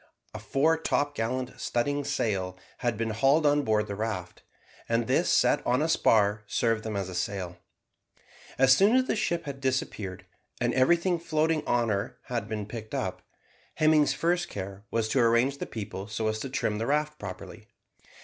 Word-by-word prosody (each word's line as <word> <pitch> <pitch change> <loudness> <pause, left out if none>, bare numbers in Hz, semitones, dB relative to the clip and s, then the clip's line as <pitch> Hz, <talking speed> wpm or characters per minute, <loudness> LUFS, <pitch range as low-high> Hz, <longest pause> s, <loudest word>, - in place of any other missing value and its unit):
A - - -6
fore 160 +4 +1
topgallant 130 -5 -1
studding 145 +4 0
sail 100 -10 -1 0.2
had 120 -3 -1
been 115 0 -1
hauled 135 +8 +3
on 145 0 +4
board 110 -5 +1
the 100 - -5
raft, 105 -4 -4 0.5
and 115 0 +1
this 135 +8 +2
set - - +3
on 125 +1 +2
a - - +1
spar 110 -9 +3
served 115 0 0
them 110 -2 -4
as 100 -2 -2
a 95 - -7
sail. 90 0 -3 1.0
As 135 0 +6
soon 205 - +4
as 260 0 +4
the - - 0
ship 170 -6 -1
had 140 -1 -6
disappeared, 105 -8 -2 0.3
and 120 0 +1
everything 170 +7 +3
floating 160 -1 +1
out 120 -1 +2
of 115 - -2
her 110 +5 -2
had 115 -4 -4
been 105 -2 -3
picked 110 0 -7
up, - - -3 0.5
Hemming's 155 -1 +4
first 175 +1 0
care 100 0 -7
was 115 -1 0
to 130 - +2
arrange 120 +4 +3
the - - -4
people 100 -3 -6
so 110 +1 -2
as 110 0 -2
to 135 - -5
trim 105 -5 -1
the 115 - -2
raft 150 +1 0
properly. 95 -3 -8
120 Hz, 180 wpm, -28 LUFS, 105-145 Hz, 1.0 s, As